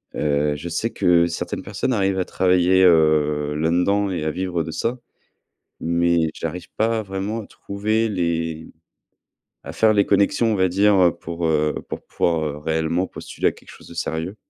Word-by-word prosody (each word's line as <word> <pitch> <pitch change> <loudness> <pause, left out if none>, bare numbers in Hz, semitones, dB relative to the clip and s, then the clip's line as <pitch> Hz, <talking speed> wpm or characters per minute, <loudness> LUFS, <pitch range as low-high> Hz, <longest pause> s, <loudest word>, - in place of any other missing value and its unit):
Heu, 75 0 0
je 75 +4 -6
sais 85 +7 -1
que 85 -1 +3
certaines 85 - -4
personnes 105 +6 -3
arrivent 95 -4 +1
à - - +2
travailler, 90 0 +3
heu, 75 -3 +3
là-dedans 90 +6 +1
et 90 -5 -3
à 80 - -1
vivre 90 -1 -2
de 80 - -6
ça, 120 +9 -2 0.8
mais 85 -1 +1
j'arrive 85 +2 -5
pas 110 0 +1
vraiment 100 +3 -4
à - - -11
trouver 110 +3 -1
les 85 -5 -2 0.9
à - - -7
faire 110 -1 +3
les 100 -1 +3
connexions 110 +3 +2
on 105 - +1
va 95 -1 +2
dire, 100 +3 +3
heu, 90 -2 +5
pour, 85 0 -4
heu, 75 -1 +1
pour - - -5
pouvoir, 85 -2 0
heu, 75 -1 -3
réellement 80 +4 -1
postuler - - -2
à - - -2
quelque - - -17
chose - - -15
de - - -11
sérieux. 85 +3 -3
85 Hz, 180 wpm, -22 LUFS, 80-100 Hz, 0.9 s, heu